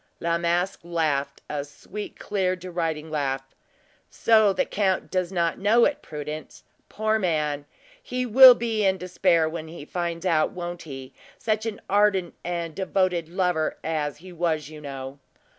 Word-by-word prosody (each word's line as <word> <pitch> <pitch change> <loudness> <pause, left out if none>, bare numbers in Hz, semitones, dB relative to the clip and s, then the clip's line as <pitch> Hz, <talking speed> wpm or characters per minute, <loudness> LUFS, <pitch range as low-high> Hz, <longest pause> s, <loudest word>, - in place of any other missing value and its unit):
La 170 0 0
Masque 175 +3 0
laughed 155 -5 -1
a 145 -1 -3
sweet, 180 +8 -8
clear, 190 -3 0
deriding 165 -4 -3
laugh, 135 -3 -2 0.6
"So 220 -3 +4
the 270 +8 0
count 195 -2 0
does 185 -1 0
not 170 -3 0
know 225 +4 +5
it, 290 - 0
Prudence? 150 0 -7 0.3
Poor 220 0 0
man! 150 -6 0 0.4
he 255 - -3
will 250 +2 +10
be 225 -3 -1
in 190 -1 +3
despair 180 -2 +2
when 160 0 -5
he 160 -2 -9
finds 170 +1 -3
it - - +3
out, 155 -2 +2
won't 175 -1 -5
he? 135 -3 -9 0.2
Such 220 -2 -1
an 220 - -4
ardent 200 -3 +2
and 170 -2 -3
devoted 185 -3 0
lover 180 -3 0
as 150 -3 -2
he 180 +3 -12
was 160 -3 -1
you 155 -1 -10
know!" 135 -1 -7
175 Hz, 160 wpm, -25 LUFS, 155-195 Hz, 0.6 s, will